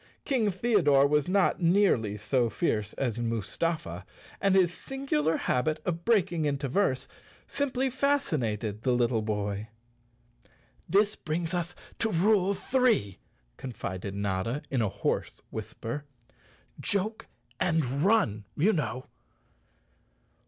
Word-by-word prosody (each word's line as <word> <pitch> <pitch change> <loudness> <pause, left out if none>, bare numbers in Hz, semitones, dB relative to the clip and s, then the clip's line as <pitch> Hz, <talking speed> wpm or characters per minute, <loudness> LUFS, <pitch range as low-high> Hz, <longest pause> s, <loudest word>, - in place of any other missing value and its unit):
King 245 -7 +2
Theodore 185 -9 +3
was 150 0 +2
not 190 0 +2
nearly 165 - +3
so 115 +3 +1
fierce 105 -8 -1
as 120 -4 -2
Mus¬ 115 -3 -3
tafa, 155 - -1 0.4
and 195 -1 +3
his 180 -2 +4
singular 175 - -1
habit 155 +5 0
of 170 -1 -2
breaking 175 -8 +2
into 140 -1 -1
verse 135 -4 +1 0.4
simply 265 -2 -1
fascinated 125 - 0
the 125 +1 +2
little 120 -2 +2
boy. 105 -1 -2 1.2
"This 205 +2 +3
brings 165 +2 -3
us 175 -1 -2 0.2
to 225 - +1
rule 200 +1 +3
three," 230 - +1 0.4
confided 100 -6 -5
Notta 100 +6 -2
in 130 -3 +1
a 110 - +1
hoarse - - -2
whisper. 140 +6 -5 0.7
"Joke 205 +2 -1 0.3
and 160 -4 +2 0.2
run, 175 - +2
you 200 +9 +4
know!" 125 -5 -2
155 Hz, 115 wpm, -28 LUFS, -, 1.2 s, his